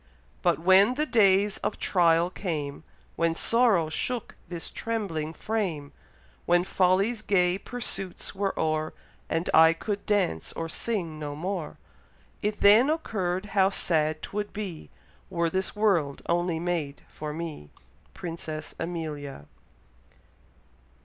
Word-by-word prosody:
But -, -, +3 dB
when 190 Hz, +7 st, +5 dB
the 300 Hz, +3 st, +1 dB
days 205 Hz, -5 st, +4 dB
of -, -, -3 dB
trial 170 Hz, -1 st, +3 dB
came, 155 Hz, -7 st, -4 dB, 0.3 s
When 165 Hz, 0 st, +1 dB
sorrow 225 Hz, -6 st, +3 dB
shook 240 Hz, +8 st, -3 dB
this 175 Hz, -2 st, -5 dB
trembling 195 Hz, -9 st, -3 dB
frame, 170 Hz, -7 st, -3 dB, 0.6 s
When 175 Hz, 0 st, +4 dB
folly's 195 Hz, +5 st, +2 dB
gay 180 Hz, -3 st, +2 dB
pursuits 195 Hz, -6 st, -4 dB
were 195 Hz, 0 st, -2 dB
o'er, 155 Hz, 0 st, 0 dB, 0.3 s
And 165 Hz, +2 st, -1 dB
I 160 Hz, +1 st, +8 dB
could 200 Hz, +4 st, -4 dB
dance 195 Hz, -, 0 dB
or 165 Hz, -, -4 dB
sing 170 Hz, -3 st, -3 dB
no 145 Hz, -1 st, -4 dB
more; 175 Hz, +1 st, -4 dB, 0.6 s
It 210 Hz, 0 st, -2 dB
then 215 Hz, +6 st, +7 dB
occurr'd 200 Hz, -, -1 dB
how 195 Hz, -1 st, +5 dB
sad 155 Hz, -5 st, 0 dB
'twould 205 Hz, 0 st, -4 dB
be 195 Hz, -7 st, -6 dB, 0.4 s
Were 170 Hz, -3 st, 0 dB
this 190 Hz, +3 st, -1 dB
world 180 Hz, -10 st, +1 dB
only 175 Hz, -1 st, +1 dB
made 165 Hz, -5 st, -2 dB
for 150 Hz, 0 st, -6 dB
me. 155 Hz, -, -6 dB, 0.5 s
Princess 160 Hz, -2 st, -6 dB
Amelia. 150 Hz, -, -5 dB
175 Hz, 125 wpm, -27 LUFS, 160-205 Hz, 0.6 s, I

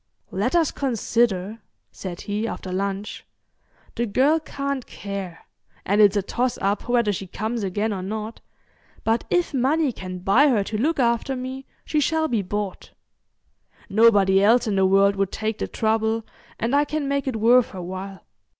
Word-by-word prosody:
"Let -, -, -1 dB
us 330 Hz, -3 st, +3 dB
consider," 225 Hz, -5 st, 0 dB, 0.3 s
said 180 Hz, -2 st, -7 dB
he, 210 Hz, +2 st, -2 dB
after 190 Hz, -4 st, -6 dB
lunch. 200 Hz, +2 st, -3 dB, 0.7 s
"The 235 Hz, -, -1 dB
girl 275 Hz, +9 st, +3 dB
can't 280 Hz, -3 st, -4 dB
care, 195 Hz, -4 st, -7 dB, 0.4 s
and 205 Hz, +2 st, +3 dB
it's 205 Hz, 0 st, +5 dB
a 200 Hz, -, +1 dB
toss 245 Hz, +5 st, -1 dB
up 200 Hz, +4 st, -1 dB
whether 235 Hz, -4 st, +2 dB
she 195 Hz, 0 st, -5 dB
comes 220 Hz, +5 st, -3 dB
again 205 Hz, +3 st, -1 dB
or 190 Hz, -, -4 dB
not, 215 Hz, +3 st, -5 dB, 0.6 s
but 225 Hz, +1 st, +1 dB
if 355 Hz, -3 st, +1 dB
money 275 Hz, +3 st, +2 dB
can 185 Hz, -4 st, -7 dB
buy 195 Hz, +11 st, +4 dB
her 230 Hz, -7 st, +2 dB
to 215 Hz, -, -5 dB
look 310 Hz, +7 st, +1 dB
after 235 Hz, +2 st, +1 dB
me 260 Hz, +1 st, -6 dB, 0.2 s
she 305 Hz, -, 0 dB
shall 315 Hz, +2 st, +1 dB
be 230 Hz, -7 st, 0 dB
bought. 205 Hz, 0 st, -5 dB, 1.0 s
Nobody 200 Hz, -3 st, +5 dB
else 230 Hz, +4 st, +5 dB
in 210 Hz, -3 st, -1 dB
the 190 Hz, -1 st, +4 dB
world 195 Hz, +1 st, +4 dB
would 195 Hz, 0 st, 0 dB
take 220 Hz, 0 st, -3 dB
the -, -, -2 dB
trouble, 220 Hz, 0 st, 0 dB, 0.3 s
and 235 Hz, +5 st, 0 dB
I 290 Hz, -, +4 dB
can 295 Hz, -1 st, -3 dB
make 280 Hz, 0 st, -1 dB
it 260 Hz, -, -1 dB
worth 235 Hz, +3 st, +4 dB
her 185 Hz, -, -7 dB
while. 190 Hz, +1 st, -7 dB
220 Hz, 170 wpm, -23 LUFS, 195-255 Hz, 1.0 s, it's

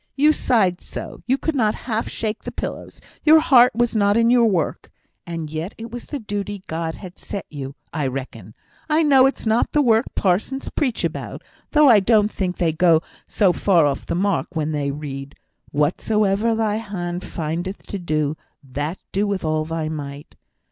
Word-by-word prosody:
You 300 Hz, +3 st, +5 dB
sighed 195 Hz, -11 st, +1 dB
so, -, -, -8 dB
you 260 Hz, +2 st, +3 dB
could 320 Hz, -, -2 dB
not 215 Hz, -5 st, +2 dB
half 225 Hz, -2 st, -1 dB
shake 215 Hz, 0 st, -3 dB
the -, -, -5 dB
pillows; -, -, -6 dB, 0.2 s
your 315 Hz, +1 st, +7 dB
heart 250 Hz, -6 st, +5 dB
was 240 Hz, -1 st, +1 dB
not 205 Hz, 0 st, +3 dB
in 230 Hz, +1 st, +4 dB
your 240 Hz, -2 st, +5 dB
work; 180 Hz, -7 st, -1 dB, 0.4 s
and 165 Hz, -2 st, -4 dB
yet 160 Hz, +5 st, -4 dB
it 225 Hz, 0 st, -8 dB
was 240 Hz, 0 st, -7 dB
the 290 Hz, -, -4 dB
duty 205 Hz, -3 st, -5 dB
God 160 Hz, 0 st, -3 dB
had 185 Hz, -2 st, -11 dB
set 200 Hz, -, -6 dB
you, 140 Hz, -2 st, -6 dB, 0.2 s
I 150 Hz, -4 st, -1 dB
reckon; 125 Hz, -6 st, -7 dB, 0.3 s
I 310 Hz, +1 st, +3 dB
know 270 Hz, -3 st, +6 dB
it's 270 Hz, -, -4 dB
not 220 Hz, +2 st, +1 dB
the 295 Hz, -, +4 dB
work 230 Hz, -1 st, +3 dB
parsons 210 Hz, +8 st, 0 dB
preach 260 Hz, -6 st, -1 dB
about; -, -, -4 dB, 0.3 s
though 300 Hz, -1 st, +5 dB
I 230 Hz, -5 st, +8 dB
don't 210 Hz, +1 st, +3 dB
think 180 Hz, -2 st, -2 dB
they 165 Hz, -3 st, +1 dB
go 165 Hz, -1 st, +4 dB, 0.2 s
so 195 Hz, -4 st, +3 dB
far 175 Hz, -5 st, +3 dB
off 140 Hz, -2 st, -2 dB
the -, -, -1 dB
mark 180 Hz, -3 st, -1 dB
when 155 Hz, -1 st, -1 dB
they 145 Hz, -2 st, -1 dB
read, 140 Hz, -1 st, -6 dB, 0.4 s
'whatsoever 200 Hz, +8 st, +1 dB
thy 215 Hz, -1 st, 0 dB
hand 180 Hz, -5 st, -4 dB
findeth 170 Hz, +4 st, -4 dB
to 200 Hz, -, -5 dB
do, 155 Hz, -3 st, -1 dB, 0.3 s
that 145 Hz, +6 st, -4 dB
do 205 Hz, +2 st, 0 dB
with 195 Hz, -4 st, -2 dB
all 155 Hz, 0 st, 0 dB
thy 165 Hz, -1 st, -3 dB
might.' 145 Hz, -2 st, -7 dB
195 Hz, 185 wpm, -22 LUFS, 155-225 Hz, 0.4 s, I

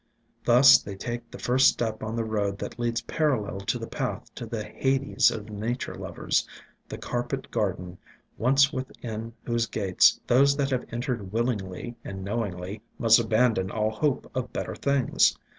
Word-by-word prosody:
Thus 125 Hz, +2 st, +8 dB
they 100 Hz, -, -7 dB
take 120 Hz, +3 st, -5 dB
the -, -, -9 dB
first 130 Hz, +2 st, +4 dB
step 110 Hz, -2 st, 0 dB
on 110 Hz, +1 st, -4 dB
the 115 Hz, -, 0 dB
road 105 Hz, -3 st, -1 dB
that -, -, -7 dB
leads 120 Hz, -1 st, 0 dB
parallel 130 Hz, -11 st, 0 dB
to 100 Hz, -, -1 dB
the -, -, -5 dB
path -, -, -4 dB
to -, -, -7 dB
the -, -, -4 dB
hades 135 Hz, -2 st, +2 dB
of 110 Hz, -2 st, -6 dB
nature 110 Hz, +5 st, -3 dB
lovers, -, -, -1 dB, 0.4 s
the -, -, -6 dB
carpet 120 Hz, +2 st, -4 dB
gar 105 Hz, -5 st, +1 dB
den, 90 Hz, 0 st, -10 dB, 0.4 s
once 135 Hz, +3 st, +3 dB
within 115 Hz, -3 st, -6 dB
whose 115 Hz, -1 st, 0 dB
gates 95 Hz, -4 st, +3 dB
those 140 Hz, +3 st, +4 dB
that 140 Hz, -1 st, 0 dB
have 130 Hz, -1 st, -1 dB
en 120 Hz, +1 st, -3 dB
tered 120 Hz, -8 st, -3 dB
willingly 110 Hz, -1 st, -2 dB
and 95 Hz, -1 st, -6 dB
knowingly 100 Hz, -2 st, -4 dB, 0.2 s
must 115 Hz, 0 st, +6 dB
abandon 110 Hz, -3 st, +2 dB
all 110 Hz, +1 st, 0 dB
hope 135 Hz, +5 st, -1 dB
of 130 Hz, -1 st, -3 dB
better -, -, -4 dB
things. 140 Hz, -3 st, +2 dB
115 Hz, 170 wpm, -26 LUFS, 105-125 Hz, 0.4 s, Thus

